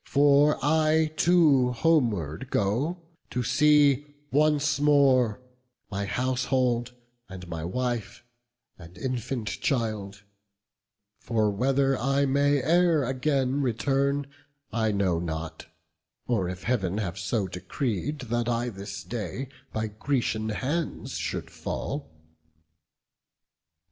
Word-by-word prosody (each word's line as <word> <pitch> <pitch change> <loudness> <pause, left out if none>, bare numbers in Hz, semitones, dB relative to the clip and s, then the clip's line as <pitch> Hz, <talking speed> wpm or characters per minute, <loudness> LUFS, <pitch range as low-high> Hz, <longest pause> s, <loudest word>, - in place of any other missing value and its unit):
For 145 +1 +4
I 155 +1 +3
too 150 -8 +4
homeward 115 - +1
go; 135 - 0 0.3
to 125 - -2
see 150 0 +4 0.2
once 150 0 +2
more 135 -6 +4 0.5
My 100 +1 -2
household, 125 +1 0 0.3
and 90 -2 -9
my 85 -2 -5
wife, 120 +5 -3 0.6
and 85 +1 -13
infant 125 -2 -3
child: 105 -7 -2 1.0
For 110 -2 0
whether 135 +5 +2
I 135 +2 +2
may 140 0 +2
e'er 170 -3 +4
again 135 +1 0
return, 140 +3 0 0.5
I 110 0 +1
know 95 -4 +1
not, 80 -1 -5 0.6
or 100 -8 0
if 90 0 -7
Heav'n 100 -6 0
have 100 -3 -3
so 100 +1 -1
decreed, 125 - -3
That 120 -1 -1
I 120 +1 0
this 100 -1 -7
day 120 +3 -5 0.2
by 110 0 -2
Grecian 110 0 -1
hands 145 +9 -3
should - - -4
fall." - - -5
125 Hz, 105 wpm, -27 LUFS, 105-140 Hz, 1.0 s, For